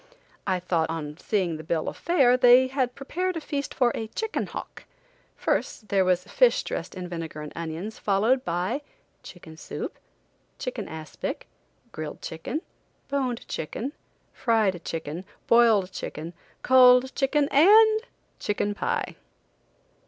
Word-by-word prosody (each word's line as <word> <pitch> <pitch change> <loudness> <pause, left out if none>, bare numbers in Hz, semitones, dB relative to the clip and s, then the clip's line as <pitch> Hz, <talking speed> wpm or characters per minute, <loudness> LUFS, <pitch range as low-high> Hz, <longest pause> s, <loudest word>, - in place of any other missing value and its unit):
I 185 -2 +1
thought, 170 -3 0
on 150 -2 -4
seeing 180 -5 -1
the 155 - -9
bill 160 0 -1
of - - -3
fare, 275 -8 +3
they 250 +1 +7
had 260 -1 -1
prepared 360 +6 -2
a - - -1
feast 285 -2 -4
for 245 -2 +2
a 220 - -4
chicken 445 - -3
hawk. - - -8 0.5
First, 210 - -2
there 195 -1 +3
was 180 -1 +2
fish 480 - +3
dressed - - -5
in 180 -1 -5
vinegar 165 -3 -6
and 150 - -8
onions, 170 +6 -5
followed 220 +6 +2
by 180 - -1 0.4
chicken 160 -3 -12
soup, - - -6 0.6
chicken - - -4
aspic, 160 -1 -6 0.5
grilled 155 -4 -6
chicken, 165 - -4 0.5
boned 260 -4 -2
chicken, 225 - -4 0.4
fried 210 -7 +1
chicken, 160 +1 -5 0.2
boiled 225 -5 +4
chicken, 160 0 -6 0.3
cold 255 0 +6
chicken 285 +1 +2
and 435 +8 +6 0.4
chicken 205 0 -1
pie! 465 - -2
215 Hz, 135 wpm, -26 LUFS, 170-265 Hz, 0.6 s, they